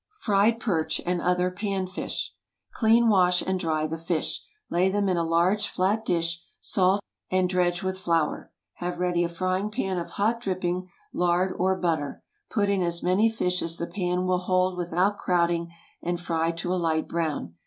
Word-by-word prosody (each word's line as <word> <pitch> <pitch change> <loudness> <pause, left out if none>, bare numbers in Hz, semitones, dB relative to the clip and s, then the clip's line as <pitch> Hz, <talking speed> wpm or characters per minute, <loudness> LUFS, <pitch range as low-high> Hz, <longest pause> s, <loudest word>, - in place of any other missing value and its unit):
FRIED 215 +2 +3
PERCH, 170 -10 0
AND 175 0 0
OTHER 180 0 +1
PAN 195 0 -2
FISH. 185 +1 -4 0.4
Clean, 230 +1 +4
wash, 180 -4 +4
and 190 0 -1
dry 155 -3 0
the 160 +1 -4
fish. 165 -1 -2 0.3
Lay 180 +2 +2
them 200 +1 +1
in 185 - +2
a 170 - +1
large 170 +5 +2
flat 205 +4 0
dish, 170 -3 0 0.2
salt, 195 +1 +2 0.3
and 185 0 +2
dredge 180 -1 +1
with 190 0 -2
flour. 165 -4 0 0.3
Have 175 0 -3
ready 175 -1 +1
a 170 - -1
frying 185 +4 -1
pan 190 -5 -2
of 170 - -5
hot 225 +3 +1
dripping, 185 -3 -2 0.2
lard, 180 +1 +2
or 190 +1 +1
butter; 160 -6 -1 0.3
put 205 -4 +1
in 200 -1 +1
as 170 -1 -1
many 190 +5 +4
fish 180 -5 -1
as 165 0 -3
the 170 - -2
pan 180 0 -1
will 185 0 +2
hold 185 0 +1
without 180 +3 0
crowding, 170 -1 +1 0.3
and 175 0 -2
fry 165 -1 0
to 175 +2 -2
a 185 - 0
light 160 -1 0
brown. 155 - -2
180 Hz, 180 wpm, -26 LUFS, 170-190 Hz, 0.4 s, Clean